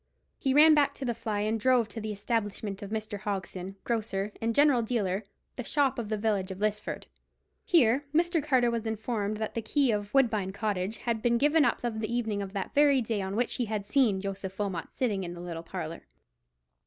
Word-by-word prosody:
He 265 -1 +1
ran 310 +2 +8
back 295 -2 +3
to 270 - -5
the 240 - 0
fly, 215 -2 -3
and 220 +2 0
drove 250 -1 +3
to 225 +2 -6
the 215 0 -3
establishment 205 -1 -2
of 200 - -6
Mr. 215 -1 -4
Hogson, 195 -2 -4
grocer 215 -3 -2
and 230 0 0
general 285 -4 +5
dealer—the 215 +1 -3
shop 275 0 +1
of 220 -3 -4
the 215 - 0
village 205 -3 0
of 190 - -6
Lisford. 210 +1 -2 0.6
Here 275 -4 +3
Mr. 335 0 +2
Carter 255 -5 +3
was 230 -1 -2
informed 215 -1 -2
that 220 0 -3
the 230 - -2
key 270 +3 +2
of 205 -1 -2
"Woodbine 215 -8 +2
Cottage 205 0 -2
had 230 -2 -2
been 235 +1 +3
given 295 +4 +4
up - - +1
on 230 -2 -2
the 220 +1 -3
evening 225 -4 -1
of 195 -1 -6
that 195 - -4
very 285 -2 +5
day 225 -3 -1
on 190 +1 -3
which 240 +2 0
he 245 - 0
had 210 -2 -3
seen 210 -4 +2
Joseph 195 -1 -5
Wilmot 195 -5 -3
sitting 210 -7 -1
in 175 -1 -5
the - - -9
little 170 -2 -5
parlour. 165 -1 -6
220 Hz, 205 wpm, -29 LUFS, 200-245 Hz, 0.6 s, ran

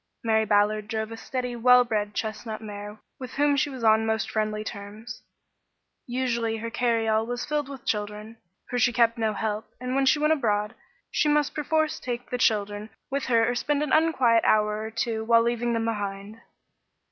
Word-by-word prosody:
Mary 220 -1 +2
Ballard 210 0 +2
drove 220 -1 -3
a - - -5
steady, 250 +1 -4
well 250 +1 +6
bred, 210 -3 -2
chestnut 215 0 -4
mare 210 -1 -8 0.2
with 255 -1 -8
whom 290 0 +2
she 280 +1 +1
was 260 -4 -8
on 220 0 +5
most 220 -1 -1
friendly 215 -1 -1
terms. 210 +2 -8 0.9
Usually 240 -3 -1
her 230 +1 -5
carryall 225 -2 +1
was 245 0 -3
filled 295 -2 -2
with 270 -3 -9
children, 210 +1 -3 0.3
for 245 - -2
she 245 - +4
kept 230 0 +2
no 220 -1 +1
help, 215 0 -3
and 250 +1 -3
when 270 0 +2
she 300 - +5
went 305 +1 +3
abroad, 210 -6 0 0.4
she 300 - +2
must 295 -1 +2
perforce 310 +1 0
take 245 0 -5
the 250 - -2
children 205 -1 0 0.2
with 280 0 -1
her 230 -2 +3
or 245 - +1
spend 290 +4 0
an 300 - -2
unquiet 265 -8 +4
hour 210 0 +2
or 220 - -4
two 225 0 -2
while 230 0 +4
leaving 235 0 0
them 225 -1 0
behind. 205 0 -4
230 Hz, 185 wpm, -26 LUFS, 215-250 Hz, 0.9 s, well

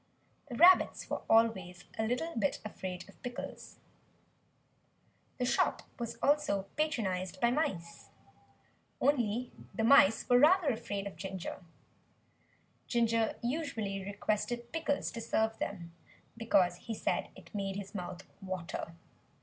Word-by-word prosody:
The 245 - -5
rabbits 355 +7 +6
were - - -1
always 190 -6 +3
a 220 - -1
little 285 +8 -2
bit 205 -4 0
afraid 185 -4 -6
of - - -18
Pickles. 245 -1 -7 1.6
The 250 - 0
shop 245 - +1 0.2
was 235 -1 -4
also 290 -9 +2
patronized 190 - -1
by 235 +3 +3
mice 185 - -2 0.9
only 245 -3 +1 0.2
the 225 - 0
mice 225 -4 +6
were 245 0 +6
rather 325 +2 +5
afraid 205 -4 -3
of 195 -5 -7
Ginger. 190 0 -6 1.2
Ginger 230 -2 +2
usually 235 -8 -2
requested 215 +4 -2
Pickles 310 -3 -1
to 230 - -6
serve 220 -1 0
them, 170 -4 -5 0.4
because 195 -6 +2
he 225 +5 -6
said - - -1
it - - -15
made 195 -2 -2
his 200 +1 -6
mouth 180 -1 -6 0.2
water. 180 -3 -5
220 Hz, 125 wpm, -32 LUFS, 190-245 Hz, 1.6 s, rabbits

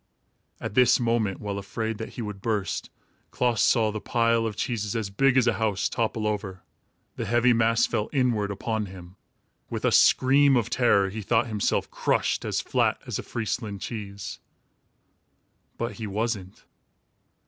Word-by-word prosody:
At - - -5
this 125 +1 +5
moment, 115 -5 0
while 100 -1 -4
afraid 110 +2 -4
that 110 - -6
he 120 - -5
would 105 -2 -6
burst, 105 -5 -2 0.4
Klaas 120 -4 0
saw 110 -3 +3
the 110 0 -5
pile 115 +1 +1
of 105 - -5
cheeses, 110 -1 -2
as 110 -3 -2
big 135 +5 +3
as 130 - +5
a 120 - +3
house, 105 -3 +1
topple 110 -2 -2
over. 100 -3 -3 0.5
The - - -3
heavy 120 +1 +3
mass 115 0 +3
fell 105 - -2
inwards 120 -7 +1
upon 105 +1 -2
him. 90 -1 -12 0.5
With - - -3
a - - +3
scream 135 +1 +5
of 115 -2 -1
terror, 100 -6 +3
he 110 +2 -5
thought 115 +3 +2
himself 110 -3 -1
crushed - - 0
as - - -1
flat - - +1
as - - -3
a - - -2
Friesland 110 -3 -4
cheese. 100 -3 -6 1.4
But 115 0 -2
he 110 -2 -5
wasn't! 105 -2 -3
110 Hz, 160 wpm, -26 LUFS, 100-120 Hz, 1.4 s, this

